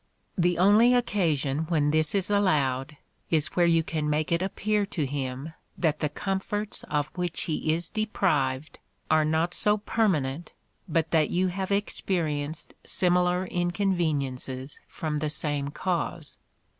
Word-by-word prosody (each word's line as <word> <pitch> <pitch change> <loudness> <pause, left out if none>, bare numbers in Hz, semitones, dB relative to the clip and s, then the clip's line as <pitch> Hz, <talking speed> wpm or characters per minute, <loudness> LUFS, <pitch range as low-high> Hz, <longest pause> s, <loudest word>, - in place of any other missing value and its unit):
The 175 -2 +2
only 210 +7 +5
occasion 160 - 0
when 150 -3 +2
this 155 +3 +2
is 195 0 +2
allowed, 150 -8 +1 0.3
is 155 -2 +2
where 175 -1 +4
you 165 -1 +3
can 155 -2 -2
make 150 +1 0
it 170 +1 +2
appear 205 +2 0
to 160 -6 -2
him 135 +2 -4 0.2
that 155 -3 +1
the 150 - 0
comforts 195 +5 -3
of 150 0 -1
which 175 -2 -2
he 155 -1 -1
is 165 +1 -1
deprived 160 -10 -1 0.3
are 155 0 +5
not 160 +3 0
so 210 +2 +3
permanent 175 -9 -1 0.4
but 165 0 0
that 155 -3 +3
you 185 +1 +1
have 190 +2 -4
experienced 160 -7 -1
similar 180 0 +2
inconveniences 155 -8 -1
from 150 -2 -3
the 155 0 -1
same 145 -2 0
cause. 170 -2 -3
165 Hz, 140 wpm, -27 LUFS, 150-185 Hz, 0.4 s, only